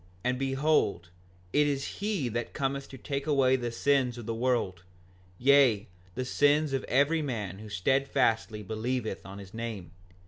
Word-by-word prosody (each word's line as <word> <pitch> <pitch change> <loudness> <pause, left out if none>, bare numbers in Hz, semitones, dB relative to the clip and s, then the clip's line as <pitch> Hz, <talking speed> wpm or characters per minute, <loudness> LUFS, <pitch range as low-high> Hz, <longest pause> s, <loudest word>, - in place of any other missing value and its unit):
And 125 0 0
behold, 135 - +1 0.4
it 145 0 +4
is 140 -1 -3
he 200 - -1
that 120 +1 -3
cometh 140 -1 -2
to 135 - -9
take 140 +2 -4
away 135 -3 +4
the 120 -2 -2
sins 130 -1 +1
of 120 - -7
the 115 - -2
world, 115 -7 0 0.6
yea, 130 -5 +5 0.3
the 130 +1 -2
sins 145 +2 +3
of 135 - 0
every 145 +5 +2
man 105 - -4
who 110 0 -9
steadfastly 110 0 +1
believeth 110 0 -3
on 95 +1 -9
his 100 -2 -11
name. 110 -7 -5
125 Hz, 160 wpm, -29 LUFS, 110-140 Hz, 0.6 s, yea